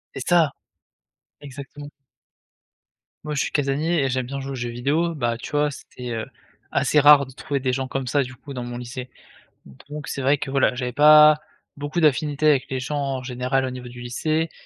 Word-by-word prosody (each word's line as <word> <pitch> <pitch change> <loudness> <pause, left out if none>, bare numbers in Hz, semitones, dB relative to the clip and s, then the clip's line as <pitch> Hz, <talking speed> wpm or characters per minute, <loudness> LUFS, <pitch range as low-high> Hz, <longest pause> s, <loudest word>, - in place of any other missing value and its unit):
C'est - - -4
ça! 165 -4 +4 0.9
Exactement. 145 +1 -10 1.3
Moi 150 -1 -4
je 135 - +1
suis - - -4
casanier 150 +3 0
et 135 - 0
j'aime 130 0 -1
bien 140 +2 -5
jouer 135 0 -5
aux - - -4
jeux 120 -1 -4
vidéo, 145 +8 0
bah, 120 -5 -1
tu - - -9
vois, 150 0 +2
c'était, 125 -3 -9
heu, 115 -1 -3 0.5
assez 150 - +2
rare 145 -2 +7
de - - -12
trouver 140 +1 -3
des 130 -1 -1
gens 130 0 -2
comme 135 -1 -4
ça, 140 +2 +2
du 130 +1 -9
coup, 140 +1 -11
dans 125 -1 -5
mon 120 0 -6
lycée. 125 +1 -7 0.8
Donc 150 0 -7
c'est 135 - -4
vrai 140 +2 +3
que 135 - -5
voilà, 135 -2 +2
j'avais 125 -1 -3
pas 150 0 +7 0.4
beaucoup 145 +4 -4
d'affinités 150 0 +2
avec 140 -4 +3
les 130 - -2
gens, 135 +3 -3
en 135 -2 -2
général, 130 +1 -1
au 130 - -2
niveau 125 -1 -8
du 125 0 -11
lycée. 155 +6 -1
135 Hz, 205 wpm, -23 LUFS, 125-150 Hz, 1.3 s, rare